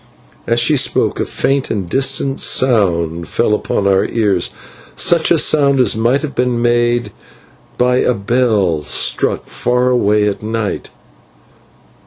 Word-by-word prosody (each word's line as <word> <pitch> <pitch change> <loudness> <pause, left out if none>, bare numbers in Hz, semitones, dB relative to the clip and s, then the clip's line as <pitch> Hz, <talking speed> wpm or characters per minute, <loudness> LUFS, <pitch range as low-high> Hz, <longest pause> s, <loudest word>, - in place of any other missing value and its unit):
As 115 0 +1
she 150 +5 +3
spoke - - 0
a - - -1
faint 135 0 -1
and 100 -5 -3
distant 135 +5 -1
sound 85 -9 +1
fell 105 - 0
upon 105 -1 -2
our 95 -1 +2
ears 100 -6 0 0.5
such 170 -2 +2
a 170 - +3
sound 140 -3 +2
as 125 - +3
might 120 +6 0
have 150 - -5
been 125 -1 -1
made 120 -1 0 0.7
by 125 0 +2
a 125 - +1
bell 100 -6 0
struck - - -1
far 125 +1 -1
away 105 -3 +1
at 100 - -3
night. 110 -1 -4
120 Hz, 140 wpm, -15 LUFS, 105-130 Hz, 0.7 s, she